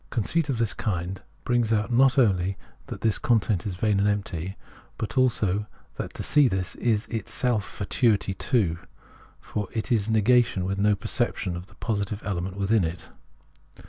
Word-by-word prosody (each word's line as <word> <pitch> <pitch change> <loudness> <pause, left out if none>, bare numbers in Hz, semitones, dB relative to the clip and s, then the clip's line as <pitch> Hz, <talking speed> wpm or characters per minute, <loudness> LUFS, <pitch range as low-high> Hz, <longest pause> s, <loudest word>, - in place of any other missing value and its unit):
Conceit 140 +7 0
of 130 - 0
this 115 -2 0
kind 90 -1 -3 0.2
brings 120 -2 +1
out 110 +2 +1
not 135 +3 +5
only 95 -6 +2 0.3
that - - -7
this 110 -3 +2
con 120 -3 +3
tent 105 -2 -1
is 95 - -3
vain 105 +1 +1
and 100 +1 +3
empty, 95 -3 -3 0.4
but 110 - -4
also 105 -6 +2 0.3
that - - -4
to - - -4
see 145 -2 +4
this 95 -5 -1
is 110 -3 +1
itself 115 0 -1
fatuity 100 0 0
too: 95 -6 0 0.6
for 105 -2 -4
it 110 +3 -3
is 110 -2 +2
negation 110 -3 +3
with 95 +1 -2
no 105 0 +4
perception 90 -1 -1
of 90 +2 -7
the 100 - -19
positive 105 -2 -2
element 95 0 -3
within 100 +1 +2
it. 80 +1 -4
105 Hz, 170 wpm, -26 LUFS, 95-115 Hz, 0.6 s, not